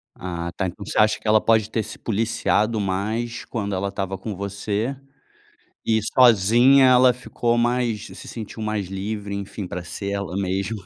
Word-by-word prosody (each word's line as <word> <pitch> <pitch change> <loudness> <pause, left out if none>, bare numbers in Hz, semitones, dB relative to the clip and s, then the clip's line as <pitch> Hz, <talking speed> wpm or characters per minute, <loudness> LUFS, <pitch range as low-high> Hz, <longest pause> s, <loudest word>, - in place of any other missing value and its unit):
Ah, 85 -1 -5
tá, 95 - -1
então, 100 +3 -8
você - - -5
acha 110 0 +4
que - - -8
ela 110 0 +5
pode 110 -1 +3
ter 110 -1 -1
se - - -9
policiado 110 0 0
mais 110 +5 -2
quando 100 -4 -3
ela 100 +1 -1
estava 95 -1 -4
com 100 +1 -6
você? 100 +6 -3 0.9
E 110 -1 +3
sozinha 125 +3 +6
ela 125 0 +6
ficou 120 -1 -1
mais 120 -3 0
se - - -11
sentiu 110 -1 -7
mais 110 -3 -2
livre, 100 +1 -4
enfim, 100 0 -5
pra 90 0 -5
ser 100 +4 -5
ela 100 -2 -3
mesma. 100 +1 -2
105 Hz, 170 wpm, -23 LUFS, 100-115 Hz, 0.9 s, sozinha